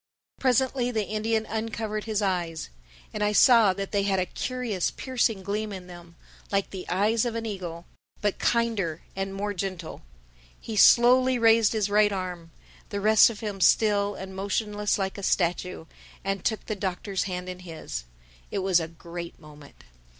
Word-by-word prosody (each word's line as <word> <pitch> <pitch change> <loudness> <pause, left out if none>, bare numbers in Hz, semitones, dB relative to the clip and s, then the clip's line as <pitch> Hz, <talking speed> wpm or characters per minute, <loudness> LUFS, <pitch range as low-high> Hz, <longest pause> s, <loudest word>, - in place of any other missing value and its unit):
Presently 255 -1 +2
the 220 -4 -1
Indian 220 +1 -1
uncovered 220 -1 -3
his 215 -2 -1
eyes. 175 -4 -2 0.4
And 210 - -2
I 210 0 +1
saw 230 -3 +6
that 195 +1 -5
they 200 - +1
had 195 -1 +1
a 185 - +1
curious 235 -3 -2
piercing 235 -6 -1
gleam 210 +2 -2
in 190 -2 -7
them—like 175 +3 -6
the 190 -2 -7
eyes 210 +5 +2
of 240 -2 -2
an 230 0 -3
eagle, 175 -5 -6 0.3
but 205 -2 -1
kinder 220 -9 0
and 195 0 -3
more 205 +1 -3
gentle. 185 -3 -5 0.6
He 225 - -6
slowly 250 +4 +6
raised 225 -2 +5
his 215 -2 +1
right 205 0 +4
arm, 180 -3 -5 0.4
the 200 - -3
rest 215 +2 +6
of 220 -3 -8
him 205 -3 -4
still 205 +1 +3
and 190 0 -8
motionless 205 +2 -1
like 195 0 -3
a - - -6
statue, 180 -2 0 0.4
and 195 -1 -2
took 220 - -1
the 215 - -3
Doctor's 190 0 -2
hand 180 -1 -4
in 180 0 -6
his. 160 - -7 0.4
It 195 - -2
was 185 -2 +4
a 165 - -3
great 170 +1 -9
moment. 150 -2 -15
200 Hz, 165 wpm, -26 LUFS, 185-220 Hz, 0.6 s, saw